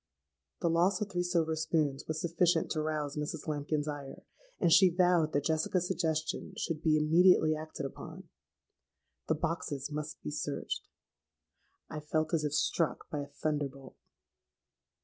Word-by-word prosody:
'—The 175 - +2
loss 180 +3 +3
of 205 -1 -3
three 175 - 0
silver 170 -3 +1
spoons 155 -3 0
was 155 0 -2
sufficient 170 0 +1
to 155 - 0
rouse 150 -2 -2
Mrs. 150 +1 -4
Lambkin's 150 0 -1
ire; 145 -2 -6 0.4
and 170 -3 +4
she 190 -2 +7
vowed 175 -3 +3
that 145 -1 0
Jessica's 160 +3 +1
suggestion 160 -2 -2
should 160 -2 -2
be 155 -2 +3
immediately 155 +1 +5
acted 155 -2 -6
upon. 170 +6 -8 1.0
The 160 - +2
boxes 150 -3 -3
must 150 +1 -5
be 75 - -4
searched. - - -3 1.0
I 155 - -6
felt 155 +1 -1
as 160 -2 +2
if 150 -1 -1
struck 165 0 0
by 150 - -2
a 140 - -4
thunderbolt. 140 -2 -4
155 Hz, 150 wpm, -31 LUFS, 150-170 Hz, 1.0 s, she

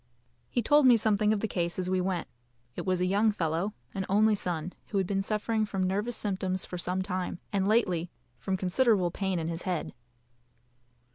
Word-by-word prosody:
He 240 - 0
told 295 +2 +5
me 245 -2 +7
something 210 -1 +2
of 215 -2 +1
the 220 - 0
case 170 -4 -1
as 185 -1 -1
we 185 0 +1
went. 185 -1 -2 0.5
It - - -5
was 185 -1 +1
a - - +3
young 205 +4 +3
fellow, 175 +2 -1 0.2
an 195 - -2
only 215 +2 +4
son, 180 -3 -2
who 205 - -2
had 190 - +2
been 195 +1 0
suffering 215 +2 0
from 195 -3 -2
nervous 205 +6 -1
symptoms 190 -2 -2
for 180 - -6
some 180 +2 -1
time, 185 -2 -3 0.2
and 195 -1 +1
lately 185 -6 +2 0.3
from 190 +9 -1
considerable 190 -1 +2
pain 190 0 -1
in 160 -1 -2
his 165 +1 -3
head. 180 -4 -3
190 Hz, 195 wpm, -29 LUFS, 180-210 Hz, 0.5 s, me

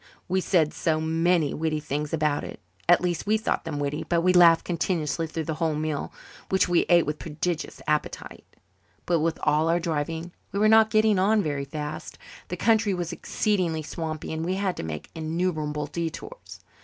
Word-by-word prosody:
We 185 +1 +1
said 165 -5 +2
so 155 -1 0
many 165 0 +1
witty 155 0 -1
things 150 0 -3
about 150 -2 0
it - - -8 0.3
at 175 - +6
least, 175 +1 -2
we 215 +1 +3
thought 220 - -2
them 160 -2 -4
witty 145 +1 -2
that 170 -1 +2
we 180 0 +4
laughed 170 -2 +6
continuously 165 -2 -1
through 160 0 -4
the 160 - -3
whole 160 -2 +1
meal, 155 -1 -3 0.4
which 190 -1 +3
we 175 -1 +2
ate 175 -1 +5
with 150 +1 -3
prodigious 160 +1 -4
appetite. 150 0 -2 0.6
But 170 -2 +2
with 160 +1 0
all 155 +2 +2
our 170 +1 +3
driving 165 +1 -3 0.2
we - - -4
were 215 +1 +4
not 220 0 +6
getting 215 -3 +3
on 210 +2 +3
very 145 -3 -2
fast. 150 +1 -6 0.3
The - - -5
country 220 -3 +2
was 175 -2 -3
exceedingly 180 -7 -1
swampy 155 0 -5
and 160 0 -3
we 180 +3 -1
had 190 -2 -1
to - - -4
make 80 -2 -6
innumerable 155 -2 -2
detours. 170 - -6
165 Hz, 185 wpm, -26 LUFS, 155-180 Hz, 0.6 s, at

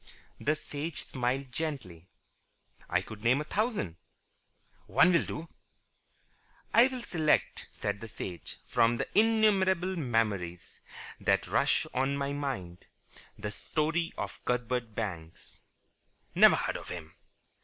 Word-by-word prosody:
The 155 +2 +1
Sage 150 +2 -4
smiled 130 +1 -2
gently. 120 - -4 0.8
"I 90 +1 +2
could 105 0 -10
name 120 +4 +3
a - - -1
thousand." 200 - -1 0.9
"One 180 0 +5
will 170 - +3
do." 160 +3 -6 1.3
"I 235 +2 +8
will 255 -2 -5
select," 155 -7 +1
said 100 - -3
the 115 - -6
Sage, 90 -5 -7
"from 120 -1 +3
the - - -2
innumerable 195 -4 +3
memories 105 - -1 0.4
that - - +2
rush - - +2
to 130 +1 +2
my 140 0 -1
mind, 120 -12 -4 0.5
the 105 0 -4
story 160 +8 -1
of - - -5
Cuthbert 125 -2 -1
Banks." 90 -5 -6 0.7
"Never - - +7
heard - - -1
of - - -10
him." 80 -3 -7
130 Hz, 120 wpm, -30 LUFS, 105-165 Hz, 1.3 s, I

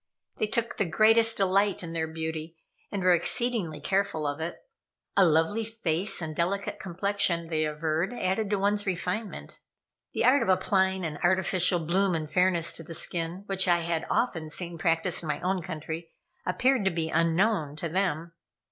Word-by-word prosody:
They 215 - 0
took 230 +2 -2
the 200 - +1
greatest 225 +5 +4
delight 195 0 +2
in 165 -1 -6
their 160 -1 -1
beauty, 160 0 -5 0.3
and 200 -2 -3
were 180 -1 +5
exceedingly 175 -3 +1
careful 190 -1 -1
of 145 +1 -2
it. 165 +2 -4 0.6
A 195 - +6
lovely 165 +6 +2
face 195 -5 -2
and 155 -1 -5
delicate 195 +5 -2
complexion, 185 -2 -1
they 155 -1 0
averred, 155 +4 -1
added 200 -2 -1
to 205 - +1
one's 205 +1 +1
refinement. 185 +4 -3 0.5
The - - 0
art 265 +3 +5
of - - -1
applying 190 0 +2
an 150 -2 -5
artificial 180 0 +2
bloom 185 +2 +2
and 155 -1 -3
fairness 175 +1 +2
to 165 - -7
the 165 +1 -6
skin, 170 +3 -2
which 195 -2 +1
I 175 -1 +3
had 165 -1 -2
often 160 -10 0
seen 170 +1 -4
practiced 165 +1 +1
in 165 - -7
my 150 - -1
own 185 0 0
country, 160 -1 -6 0.4
appeared 255 +5 +2
to - - +4
be 165 -2 -2
unknown 165 -1 +1
to 160 +2 -4
them. 170 -2 -1
175 Hz, 175 wpm, -27 LUFS, 160-195 Hz, 0.6 s, A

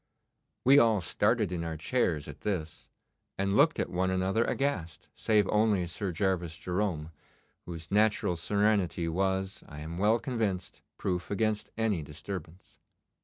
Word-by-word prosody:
We 135 +3 +8
all 110 -4 +4
started 105 +3 +1
in 85 -2 -2
our 80 -1 -4
chairs 80 - 0
at 75 -1 -10
this, 85 -7 -3 0.5
and 100 +1 0
looked 155 +6 +4
at - - -1
one 95 +1 +1
another 95 +4 +1
aghast, 120 - -2
save 105 -3 +2
only 105 -4 +3
Sir 95 +2 -3
Gervas 85 -2 -1
Jerome, 90 -4 -2 0.6
whose 85 -1 -7
natural 105 -3 +3
serenity 100 -1 +1
was, 95 +2 -1
I 75 -1 -8
am 80 +3 -6
well 105 +3 +4
convinced, 110 -8 -3 0.2
proof 90 -1 -2
against 105 +1 0
any 110 -6 +1
disturbance. 80 +3 -8
95 Hz, 140 wpm, -30 LUFS, 85-105 Hz, 0.6 s, We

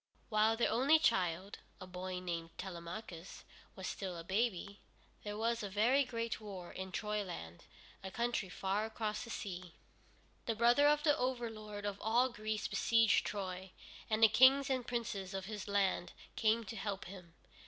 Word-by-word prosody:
While 220 0 +3
their 235 - +2
only 275 +7 +5
child, 190 - +1 0.2
a - - -7
boy 185 0 -5
named 170 -2 -5
Telemachus, 175 0 -7 0.3
was 190 - -7
still 185 -2 -4
a 165 - -6
baby, 200 +1 -1 0.4
there 210 0 -4
was 230 +1 0
a 205 - -4
very 235 +8 +4
great 230 -2 -3
war 190 -4 -7
in 190 0 -6
Troyland, 185 - -4 0.4
a 190 - -4
country 235 -2 -1
far 195 +4 -1
across 215 -1 -3
the 235 - -9
sea. 185 -7 -6 0.7
The 230 - +1
brother 240 +6 +5
of 295 0 +4
the 295 -2 +5
overlord 225 -5 -3
of 200 -1 -3
all 240 +4 +3
Greece 215 -2 -3
beseiged 225 -2 +3
Troy, 190 -2 -5 0.4
and 220 0 +2
the - - +11
kings 265 +5 +6
and 255 -2 -1
princes 205 -5 -3
of 190 0 -3
his 210 -1 -6
land 195 -3 +1 0.2
came 225 +1 +3
to 220 +1 -7
help 200 -3 -3
him. 175 -3 -11
210 Hz, 165 wpm, -35 LUFS, 190-230 Hz, 0.7 s, the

